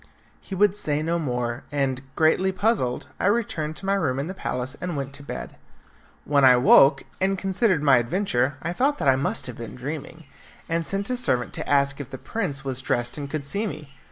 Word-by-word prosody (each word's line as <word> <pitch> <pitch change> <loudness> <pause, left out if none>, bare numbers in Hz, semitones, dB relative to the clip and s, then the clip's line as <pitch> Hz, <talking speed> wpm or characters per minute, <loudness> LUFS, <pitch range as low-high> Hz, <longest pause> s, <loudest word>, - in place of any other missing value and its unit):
He 195 - -7
would 205 +1 +3
say 150 -7 +1
no 170 +2 0
more, 125 -4 -2
and, 135 -3 0
greatly 165 +4 +3
puzzled, 190 - 0
I - - +1
returned 205 -9 0
to 190 - -8
my 195 - +2
room 160 -10 0
in 140 - -1
the 185 - -5
palace 130 -7 -4
and 180 -4 -3
went 140 0 -4
to 145 - -8
bed. - - -7 0.7
When 140 -1 +3
I 130 -1 +8
woke, 135 +3 +6 0.2
and 195 +1 +2
considered 190 -3 +1
my 135 -3 +6
adventure, 130 - 0
I 170 +2 -2
thought 280 +9 +1
that - - -1
I 135 - +6
must 135 +2 -1
have 125 -3 -6
been 115 - -7
dreaming, 150 +5 -6 0.4
and 165 0 -1
sent 200 +4 -2
a - - +1
servant 125 - 0
to - - -4
ask 140 -1 +2
if 135 - -8
the 130 - -7
prince 145 - -4
was 130 -1 -1
dressed 120 -1 -1
and 140 -1 -5
could 155 0 -3
see 200 +10 -2
me. 150 -7 -8
145 Hz, 215 wpm, -24 LUFS, 130-190 Hz, 0.7 s, I